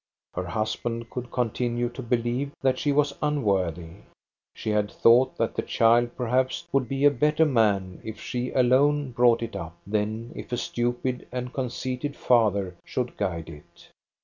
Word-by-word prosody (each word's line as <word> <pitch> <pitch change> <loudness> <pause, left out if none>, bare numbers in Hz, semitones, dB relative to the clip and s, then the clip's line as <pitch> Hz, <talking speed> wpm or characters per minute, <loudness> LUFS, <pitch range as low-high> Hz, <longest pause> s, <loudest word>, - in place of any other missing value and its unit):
Her 90 0 -3
husband 115 +3 -3
could 125 -1 -5
continue 120 0 -1
to 125 +2 -8
believe 120 +3 -1
that 130 -1 +2
she 145 - +1
was 145 0 +2
unworthy. 95 - 0 0.6
She 110 - -3
had 105 -1 +1
thought 125 +3 +4
that 115 - 0
the - - -1
child 120 +1 +3
perhaps 130 +1 0
would 135 -4 +1
be 135 +1 +1
a 145 - +7
better 150 +4 +3
man 105 - +1
if 110 -1 -7
she 125 0 -3
alone 135 +2 +3
brought 120 -1 +4
it 115 -3 -5
up, 85 -3 -6
than 110 +3 -2
if - - -8
a 120 - 0
stupid 120 +2 -2
and 125 0 -4
conceited 130 +2 -3
father 100 -7 +2
should 125 -1 -3
guide 85 -5 -3
it. 75 -2 -14
120 Hz, 160 wpm, -26 LUFS, 110-130 Hz, 0.6 s, a